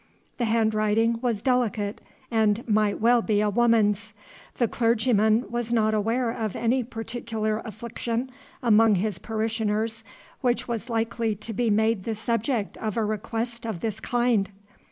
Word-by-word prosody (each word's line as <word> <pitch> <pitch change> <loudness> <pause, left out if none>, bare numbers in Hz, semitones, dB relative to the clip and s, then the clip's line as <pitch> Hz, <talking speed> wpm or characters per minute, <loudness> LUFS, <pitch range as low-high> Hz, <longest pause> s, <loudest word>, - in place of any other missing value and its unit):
The 240 - +1
handwriting 220 0 +2
was 235 -5 -1
delicate 235 -5 0 0.3
and 220 0 +1
might 210 -2 +2
well 235 +2 +4
be 215 -2 +1
a 210 0 +2
woman's. 220 -2 +2 0.4
The 240 - +2
clergyman 225 -1 +2
was 240 -1 -2
not 220 -2 +2
aware 230 +3 +1
of 220 -3 -3
any 245 +2 +1
particular 225 -2 -3
affliction 235 +3 -4 0.3
among 225 -2 +5
his 195 0 -1
parishioners 220 0 -2 0.4
which 245 -2 0
was 235 +1 -4
likely 230 -1 -1
to 215 +3 -6
be 235 +2 0
made 220 -1 +2
the 225 - -2
subject 230 0 -1
of 215 -1 -3
a 225 - +1
request 225 +3 -3
of 220 -7 -4
this 220 -1 -2
kind. 240 -4 +1
225 Hz, 145 wpm, -25 LUFS, 215-235 Hz, 0.4 s, among